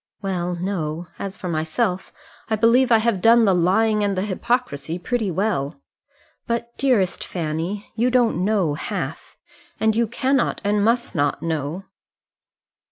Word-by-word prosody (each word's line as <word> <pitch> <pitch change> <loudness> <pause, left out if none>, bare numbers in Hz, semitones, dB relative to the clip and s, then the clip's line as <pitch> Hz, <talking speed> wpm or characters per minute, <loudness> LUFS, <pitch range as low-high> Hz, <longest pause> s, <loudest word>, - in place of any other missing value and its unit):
"Well, 180 -2 -2
no; 175 -2 -3
as 195 -1 -5
for 185 - -6
myself, 180 +5 -1 0.4
I 220 - +2
believe 235 +4 +4
I 225 - +7
have 220 -4 0
done 230 +2 +6
the 195 - +4
lying 210 +5 +2
and 200 -2 0
the 185 - 0
hypocrisy 200 - -1
pretty 220 +3 -1
well. 180 - -1 0.7
But, 235 0 -3
dearest 230 -10 +2
Fanny, 170 +4 -4
you 235 +3 +1
don't 240 -7 +2
know 195 -7 +1
half; 150 - -5 0.4
and 220 0 +2
you 230 0 +2
cannot 260 +3 0
and 205 0 +1
must 235 +2 +1
not 145 -3 0
know." 160 +3 -3
200 Hz, 145 wpm, -22 LUFS, 175-230 Hz, 0.7 s, I